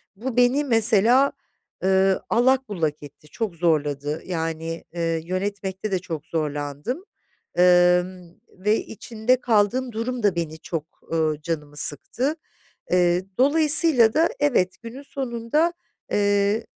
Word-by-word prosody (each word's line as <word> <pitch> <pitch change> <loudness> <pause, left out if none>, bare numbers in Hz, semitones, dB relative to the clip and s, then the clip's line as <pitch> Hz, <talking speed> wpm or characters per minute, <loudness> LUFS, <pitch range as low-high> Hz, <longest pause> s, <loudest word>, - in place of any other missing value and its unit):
bu 245 +4 -5
beni, 245 +4 +4
mesela, 230 +2 +4 0.5
ııı, 190 0 +3
allak 260 +2 +2
bullak 155 -7 -2
etti, 145 +1 -14
çok 210 +1 -4
zorladı. 150 -2 -1
Yani, 165 -1 -4
eee, 165 -1 -1
yönetmekte 195 +2 -4
de 185 - +1
çok 165 -4 -6
zorlandım, 150 - -3 0.5
emm, 180 0 +3
ve 210 +3 0
içinde 230 +3 -1
kaldığım 240 +3 +1
durum 235 +1 -4
da 195 -4 +2
beni 160 -2 -4
çok, 160 -3 -5 0.3
ııı, 155 -2 0
canımı 150 -2 -5
sıktı. 250 - +1 0.6
Eee, 180 0 +3
dolayısıyla 290 -4 +4
da 325 +4 +3
evet, 245 -11 +1
günün 240 +5 -9
sonunda 270 +5 -1 0.4
eee, 205 +2 +1
195 Hz, 120 wpm, -23 LUFS, 165-240 Hz, 0.6 s, beni